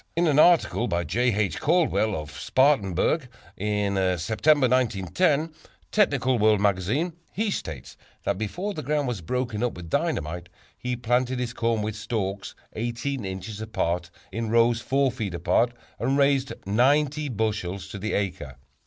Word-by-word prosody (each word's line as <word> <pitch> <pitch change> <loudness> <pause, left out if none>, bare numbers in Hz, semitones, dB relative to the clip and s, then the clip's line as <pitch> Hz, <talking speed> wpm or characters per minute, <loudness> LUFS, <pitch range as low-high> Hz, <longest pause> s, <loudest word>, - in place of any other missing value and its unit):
In 170 +1 +2
an 150 -3 +3
article 160 -8 +4
by 85 -2 0
J. 120 +10 +1
H. 105 -1 -1
Caldwell, 155 - +2
of 75 -1 -8
Spartanburg, 130 - +2
S. 130 - -14 0.3
C., - - -8
in 105 -1 0
the 95 -2 +1
September, 130 - +3
1910, 130 - +1 0.4
Technical 135 - +2
World 105 0 +4
Magazine, 105 - +1 0.2
he 215 +1 -1
states 75 - -6 0.3
that 100 -1 -1
before 180 - -3
the 155 - -5
ground 145 0 0
was 120 -7 -3
broken 120 +4 -2
up 125 -1 0
with 85 -2 -9
dynamite, 85 +3 -1 0.3
he 125 0 -3
planted 125 +2 0
his 125 -1 -3
corn 115 -2 0
with 105 0 -3
stalks 100 -2 -3 0.2
18 120 +3 -3
inches 95 +3 -6
apart 90 -5 -2 0.2
in 115 +2 -3
rows 115 +1 +3
4 135 +1 +1
feet 110 -8 -4
apart 90 +8 +2 0.3
and 130 +5 +1
raised 140 -1 +2
90 145 +7 +2
bushels 105 -5 -2
to 100 - -7
the 110 +3 -3
acre. 85 -9 -3
115 Hz, 160 wpm, -25 LUFS, 100-135 Hz, 0.4 s, article